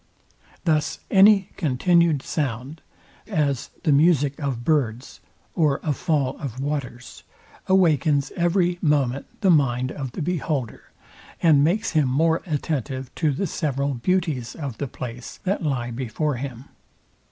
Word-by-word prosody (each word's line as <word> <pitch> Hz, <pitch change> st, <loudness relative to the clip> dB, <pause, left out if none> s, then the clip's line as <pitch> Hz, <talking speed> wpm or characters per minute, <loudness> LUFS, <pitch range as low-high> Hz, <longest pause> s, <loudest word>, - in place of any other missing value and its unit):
Thus 155 Hz, -3 st, +1 dB
any 195 Hz, 0 st, +6 dB
continued 165 Hz, 0 st, +2 dB
sound, 140 Hz, +1 st, -3 dB, 0.5 s
as 140 Hz, -5 st, -1 dB
the 155 Hz, -, +2 dB
music 145 Hz, -1 st, +3 dB
of 135 Hz, -5 st, -3 dB
birds, 130 Hz, -6 st, -1 dB, 0.3 s
or 150 Hz, -5 st, +2 dB
a 150 Hz, -, 0 dB
fall 145 Hz, -5 st, -1 dB
of 130 Hz, -4 st, -6 dB
waters, 135 Hz, -4 st, -5 dB, 0.5 s
awakens 155 Hz, -6 st, +3 dB
every 175 Hz, 0 st, +1 dB
moment 140 Hz, -4 st, +1 dB
the 190 Hz, -3 st, +4 dB
mind 130 Hz, -4 st, +2 dB
of 135 Hz, -5 st, -6 dB
the 165 Hz, -, -4 dB
beholder, 150 Hz, -7 st, -2 dB, 0.5 s
and 150 Hz, -4 st, +5 dB
makes 180 Hz, +8 st, +1 dB
him 155 Hz, -4 st, +2 dB
more 160 Hz, +5 st, +2 dB
attentive 135 Hz, -4 st, -3 dB
to 155 Hz, -3 st, +1 dB
the 140 Hz, +9 st, -2 dB
several 140 Hz, -4 st, -1 dB
beauties 150 Hz, -2 st, -1 dB
of 140 Hz, -7 st, -6 dB
the 140 Hz, -, -2 dB
place, 125 Hz, -1 st, -8 dB
that 195 Hz, +2 st, -1 dB
lie 130 Hz, -6 st, -2 dB
before 130 Hz, +4 st, -2 dB
him. 130 Hz, -1 st, -6 dB
145 Hz, 130 wpm, -23 LUFS, 130-165 Hz, 0.5 s, any